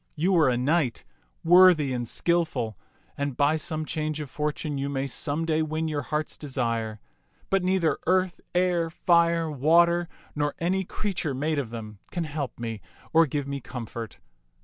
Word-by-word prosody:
You 180 +5 +2
are 155 -5 +5
a 125 - +1
knight, 135 0 +1 0.4
worthy 175 -5 +6
and 120 -1 -3
skillful, 155 -9 0 0.4
and 140 -2 -3
by 145 +2 +3
some 155 0 -3
change 155 0 -2
of 145 -4 -6
fortune 150 -1 -2
you 140 +1 -2
may 135 -1 -1
some 145 +4 -2
day 160 -1 +1
win 155 +1 -1
your 150 -2 -1
heart's 150 +3 -3
desire; 115 -6 -2 0.5
but 195 -1 +3
neither 180 -5 +1
earth, 185 0 +2
air, 175 -2 +2
fire, 170 -1 +2
water, 170 +4 +3 0.3
nor 145 0 -1
any 185 +3 0
creature 175 -8 -3
made 150 +3 0
of 130 -5 -3
them 110 -3 -8
can 175 - -2
help 145 -6 -4
me 115 -3 -4 0.3
or 165 0 +6
give 145 0 -2
me 140 -1 -4
comfort. 115 -1 -7
150 Hz, 165 wpm, -26 LUFS, 135-170 Hz, 0.5 s, worthy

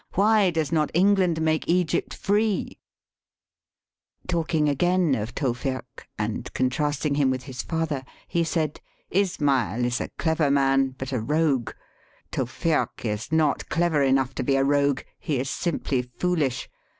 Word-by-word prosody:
Why 210 0 +4
does 160 -3 -1
not 155 -2 +2
England 185 -3 +3
make 155 0 0
Egypt 175 -3 +1
free? 210 0 0 0.7
'' - - -35
Talking 165 -3 +1
again 175 +2 +2
of 110 -1 -3
Tewfik, 130 -1 -3
and 105 +3 -3
contrasting 145 +3 0
him 140 -2 +2
with 130 -1 -2
his 125 -1 -6
father, 160 -5 -2 0.2
he 170 - +1
said, 155 -2 -1 0.3
Ismail 140 - +1
is 120 +1 -1
a - - -4
clever 160 -3 +1
man, 135 -1 +2
but 130 +1 -5
a 130 - 0
rogue. 145 -1 +1 0.6
Tewfik 130 +3 -1
is 105 +5 -3
not 155 -4 +1
clever 165 -3 +2
enough 135 -1 +2
to - - -3
be 135 +2 +2
a 135 - +3
rogue: 140 -1 +2 0.2
he 150 -5 -1
is 135 +1 -2
simply 145 -6 -1
foolish. 130 +1 -1
145 Hz, 145 wpm, -25 LUFS, 130-165 Hz, 0.7 s, Why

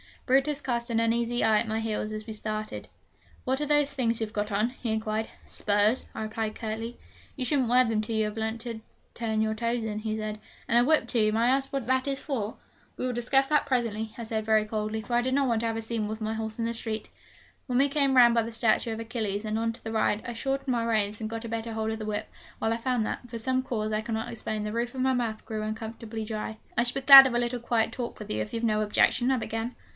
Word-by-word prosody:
Brutus 275 +3 +2
cast 240 -2 -2
an 230 -1 +1
uneasy 235 +1 +1
eye 220 -1 +5
at 235 - -2
my 220 +1 -1
heels 215 -1 -2
as 215 0 -5
we 225 - -7
started: 215 0 -4 0.6
'What 260 +1 0
are 295 - 0
those 295 -1 +2
things 235 -4 0
you've 220 -1 -3
got 210 0 -2
on?' 210 +4 +1
he 245 -2 -4
inquired. 220 0 -1 0.2
'Spurs,' 205 +4 +1
I - - -3
replied 215 0 -3
curtly. 225 +1 -4 0.4
'You 265 - -3
shouldn't 265 -1 +2
wear 250 +2 +5
them 225 -3 0
till 220 +1 -2
you 220 0 +2
have 210 +1 -5
learnt 220 +1 -2
to 230 -2 -5 0.3
turn 220 -2 -1
your 220 0 +1
toes 235 +1 -1
in,' 215 -1 -3
he 215 0 -2
said. 215 -1 -4 0.3
'And 235 -1 +5
a 245 - +3
whip, 315 - +4
too! 215 -3 +2
May 225 - +1
I 235 - +4
ask 270 +1 +1
what 275 -4 -2
that 260 +1 +2
is 275 -1 -1
for?' 230 -7 -3 0.4
'We 255 - -2
will 250 - -1
discuss 270 +3 +2
that 300 0 +2
presently,' 230 -5 -1
I 235 - -5
said 220 -1 -3
very 220 -1 +4
coldly; 215 0 -2
for 230 +3 -6
I 240 - +4
did 260 +1 -1
not 275 -1 +2
want 230 -1 +2
to 230 - 0
have 225 0 -2
a - - -2
scene 225 -1 -2
with 215 +1 -5
my 220 0 -1
horse 220 0 -4
in 230 - -1
the 230 - -1
street. 220 -2 -4 0.6
When 250 -2 0
we 280 +2 +4
came 275 -2 +2
round 240 -2 +7
by 230 - +4
the 230 +1 -6
statue 225 0 +2
of 220 - -5
Achilles 220 -3 -3
and 215 0 -1
on 230 0 0
to 235 - -13
the 225 - -4
Ride, 220 -1 +1
I 240 - -3
shortened 270 +3 -2
my 235 -2 +1
reins, 215 -2 0
and 215 -1 -4
got 225 0 -5
a - - -5
better 225 0 -3
hold 220 0 -1
of 220 - -4
the 215 - -4
whip, 215 0 -3 0.3
while 220 - 0
I - - -1
found 240 -1 0
that, 245 - -5
from 230 - -5
some 255 +3 0
cause 215 -4 -2
I 215 0 0
cannot 225 +1 -3
explain, 215 -2 -4
the 210 - -3
roof 235 +3 -2
of 260 - -2
my 260 0 +3
mouth 230 -3 -2
grew 215 -1 -4
uncomfortably 220 +1 -5
dry. 215 0 -4 0.2
'I 235 - +4
should 245 +1 -1
be 270 - -1
glad 270 0 +12
of 245 - -2
a - - +3
little 240 0 -1
quiet 230 -1 +1
talk 240 0 -5
with 210 - -7
you, 110 - -1
if 105 - -5
you've 230 0 -3
no 215 -2 +2
objection,' 215 +4 +3
I 265 - +4
began. 225 +1 -3
225 Hz, 270 wpm, -28 LUFS, 220-245 Hz, 0.6 s, glad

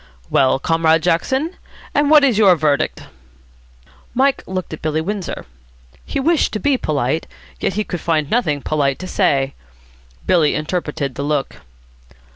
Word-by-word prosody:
"Well, 130 0 +3
Comrade 165 +2 +2
Jackson, 265 - 0 0.4
and 290 0 +2
what 300 -1 +7
is 245 -6 +3
your 195 -4 +6
verdict?" 150 -3 0 1.1
Mike 270 +2 +2
looked 185 -3 -4
at 160 - -7
Billy 155 0 -1
Windsor. 195 +3 -4 0.6
He - - -3
wished 320 +3 +2
to 215 - -2
be 285 +2 +2
polite, 150 - -1 0.3
yet - - -1
he 215 - 0
could 175 -4 -5
find 155 -3 0
nothing 150 - 0
polite 140 -3 0
to 185 - -7
say. 140 -9 +1 0.7
Billy 165 -5 +3
interpreted 155 -4 -3
the 140 - -4
look. 145 -1 -2
165 Hz, 145 wpm, -19 LUFS, 150-215 Hz, 1.1 s, what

